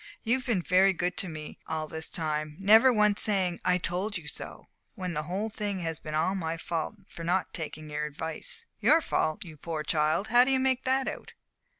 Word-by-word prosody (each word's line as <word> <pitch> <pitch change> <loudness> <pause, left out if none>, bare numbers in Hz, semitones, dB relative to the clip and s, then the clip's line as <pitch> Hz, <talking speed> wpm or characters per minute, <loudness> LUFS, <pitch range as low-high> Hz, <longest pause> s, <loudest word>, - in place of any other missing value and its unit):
"You've 255 +3 0
been 200 -8 +1
very 190 +2 +4
good 175 0 -1
to 190 - +1
me 155 -1 -8
all 160 -1 -2
this 160 +1 -4
time 155 -2 -2
never 220 +6 +7
once 210 -3 +3
saying 185 -5 +2
'I 180 0 +3
told 185 +4 -1
you 160 -3 -10
so,' 150 - -5 0.3
when 180 -2 -4
the 150 - -1
whole 205 +5 -2
thing 205 -3 -3
has 165 -2 -3
been 155 -1 -5
all 165 +5 +2
my 165 -4 -2
fault 165 +3 -3
for 165 - -9
not 180 +3 0
taking 155 -2 -6
your 150 0 -3
advice." 155 +2 -5
"Your 295 +10 +5
fault, 200 - -1
you 160 -3 -10
poor 155 +1 -4
child! 155 +6 +1
How 240 +2 +7
do 255 - 0
you 265 -1 +3
make 260 -1 +1
that 265 +1 +1
out?" - - -6
180 Hz, 210 wpm, -29 LUFS, 160-210 Hz, 0.3 s, never